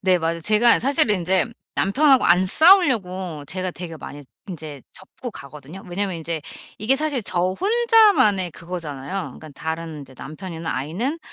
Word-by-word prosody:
네 185 -1 +3
맞아요. 165 0 -2
제가 215 +6 +5
사실은 255 -5 +2
인제 185 +2 +1 0.3
남편하고 265 +6 +3
안 180 +2 +4
싸우려고 190 - +3
제가 185 +2 -4
되게 170 -2 -8
많이 145 -1 -10 0.2
인제 155 -7 -8
접고 215 +6 -9
가거든요. 150 +6 -11
왜냐하면 190 0 -2
인제 165 0 -4 0.4
이게 215 +6 +2
사실 290 -2 -1
저 175 - -1 0.2
혼자만의 415 - +4
그거잖아요. 165 -4 -7 0.2
그러니까 155 - -12
다른 160 +1 -6
인제 135 -2 -13
남편이나 165 +3 -7
아이는 185 - -3
180 Hz, 365 characters per minute, -22 LUFS, 160-230 Hz, 0.4 s, 제가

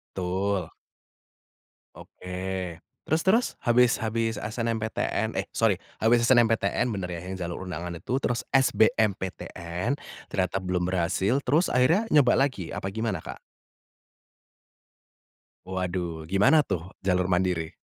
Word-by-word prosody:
Betul. 95 0 -1 1.3
Oke 90 -1 -6 0.3
terus 160 +4 +1
terus, 225 +6 +4
habis 120 0 +3
habis 115 0 -1
SNMPTN, 110 0 -2
eh - - 0
sorry - - +2 0.2
habis 115 +1 +4
SNMPTN, 115 -3 +3
bener 90 -2 -4
ya 85 - -4
yang 95 - -4
jalur 90 0 -5
undangan 85 0 -5
itu, 130 +9 -2
terus 120 - -1
SMBPTN, 100 -3 +1 0.3
ternyata 95 0 -1
belum 90 -1 -1
berhasil, 95 +8 +1
terus 155 +8 +2
akhirnya 165 - +3
nyoba 135 -4 +5
lagi 130 -11 0
apa - - -5
gimana, 110 -5 -1
Kak? - - -9 2.3
Waduh 90 -3 -3
gimana 100 - +4
tuh 90 -2 -3 0.2
jalur 90 -1 +2
mandiri? 90 -3 0
95 Hz, 115 wpm, -26 LUFS, 90-120 Hz, 2.3 s, nyoba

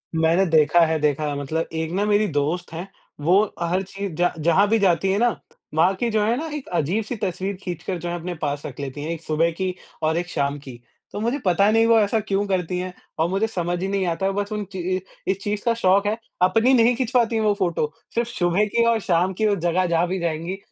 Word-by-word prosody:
मैंने 165 +4 +3
देखा 155 +1 +4
है 160 0 0
देखा 150 0 0
मतलब 150 +4 -2
एक 160 0 -2
ना 200 +3 +1
मेरी 210 0 +3
दोस्त 160 +4 -1
हैं, 175 +4 -5 0.3
वो 185 +7 +4 0.2
हर 175 +3 +1
चीज़ 195 -1 -6
ज 175 - +4
जहाँ 180 +5 +4
भी 225 0 +3
जाती 190 0 +2
है 195 - +1
ना, 240 +1 +4 0.5
वहाँ 180 +5 +4
की 235 +4 -1
जो 215 -1 +2
है 230 +2 +2
ना 320 +3 -3
एक 280 - -9
अजीब-सी 210 - -1
तस्वीर 190 +1 -2
खींचकर 180 +1 -4
जो 175 - -4
है 175 - -2
अपने 175 +2 -4
पास 145 -1 -2
रख 130 - -8
लेती 140 +1 -5
है, 160 - -3
1 165 - -7
सुबह 165 +1 +1
की 185 -1 0 0.3
और 160 +1 +2
1 175 +1 -2
शाम 140 -1 -1
की। 130 -4 -11 0.3
तो - - -5
मुझे 240 +6 0
पता 195 +3 +4
नहीं 225 +1 +4
वो 230 -1 +6
ऐसा 215 +1 +2
क्यों 200 -1 -1
करती 180 -2 -1
हैं? 180 0 -4 0.3
औ 160 - +3
मुझे 195 +4 +1
समझ 175 -4 -2
ही 190 - -1
नहीं 195 -1 0
आता 170 +3 -1
है 195 - +2
बस 205 +1 -2
उन 210 -1 -2
ची 185 -1 -2
अ, - - -3 0.3
इस 190 - -2
चीज़ 205 0 -2
का 235 - +3
शौक 200 -3 +3
है। 215 +2 0 0.2
अपनी 225 +8 +4
नहीं 240 -1 +5
खिंचवाती 240 -2 +1
है 220 - +1
वो 210 -1 +3
फ़ोटो, 170 -5 0 0.2
सिर्फ़ 235 0 0
सुबह 180 -1 +1
की 235 +3 +1
और 230 -1 +3
शाम 180 +1 +1
की 215 +4 +1
वो 205 - +2
जगह 175 0 +1
जहाँ 170 0 +1
भी 185 +2 -2
जाएँगी, 170 +2 -2
185 Hz, 245 wpm, -23 LUFS, 165-210 Hz, 0.5 s, वो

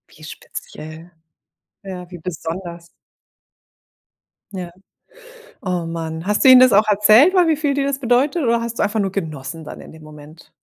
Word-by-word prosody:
Wie 155 - -17
speziell. 155 +1 -10 0.7
Ja, 180 -2 -8
wie 175 - -8
besonders. 170 +1 -7 1.7
Ja. 180 -2 -6 0.9
Oh 180 -3 -2
man, 165 0 -5
hast 210 - +1
du 265 - +7
ihnen 255 -1 +9
das 255 -3 +6
auch 210 +2 +4
erzählt, 215 - +5
weil 360 -3 +4
wie 315 - +2
viel 290 -2 -1
dir 280 - -1
das 280 -1 -2
bedeutet 270 +6 +1
oder 235 -1 +1
hast 235 0 -5
du - - +2
einfach 210 +1 -1
nur 195 -1 -1
genossen 160 -4 -6
dann - - -10
in - - -12
dem 160 0 -15
Moment? 155 +1 -15
190 Hz, 170 wpm, -19 LUFS, 165-235 Hz, 1.7 s, ihnen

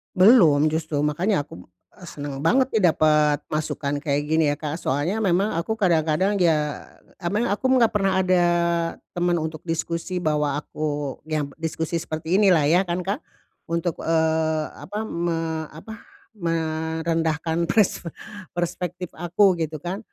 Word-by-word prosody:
Belum 175 - +6
justru, 160 -1 -2
makanya 160 +3 +1
aku, 90 -10 -13 0.3
eee, 180 - -11
seneng 145 -3 -6
banget, 255 - +2
nih, 210 -5 +3
dapet 150 -1 +3
masukan 145 -2 -2
kayak 145 -1 0
gini, 160 +1 +2
ya, 145 - +1
Kak. 155 +2 -5
Soalnya 155 +9 -1
memang 200 0 +2
aku 220 +6 -2
kadang-kadang, 185 0 +1
ya 150 -4 +1 0.3
emang 205 +7 -1
aku 205 +6 0
enggak 230 -3 +4
pernah 195 -3 +1
ada 180 -1 +3 0.7
teman 175 0 0
untuk 160 -1 -3
diskusi 170 +2 -3
bahwa 150 -2 +1
aku 145 -1 -4
yam 150 -3 -2
diskusi 160 +1 -2
seperti 160 +4 -1
inilah, 185 -7 +5
ya, 175 +6 +3
kan, 175 +1 -2
Kak. 200 +8 -2 0.5
Untuk, 170 0 -2
eee, 160 -1 +1 0.2
apa 210 +3 -5
me 165 -4 -2
apa, 220 +10 -11 0.3
merendahkan 165 -2 -1
persfe 180 -1 +1 0.5
perspektif 175 0 -3
aku 180 +2 +3
gitu, 155 -1 -3
kan. 185 +4 -3
165 Hz, 140 wpm, -23 LUFS, 155-185 Hz, 0.7 s, Belum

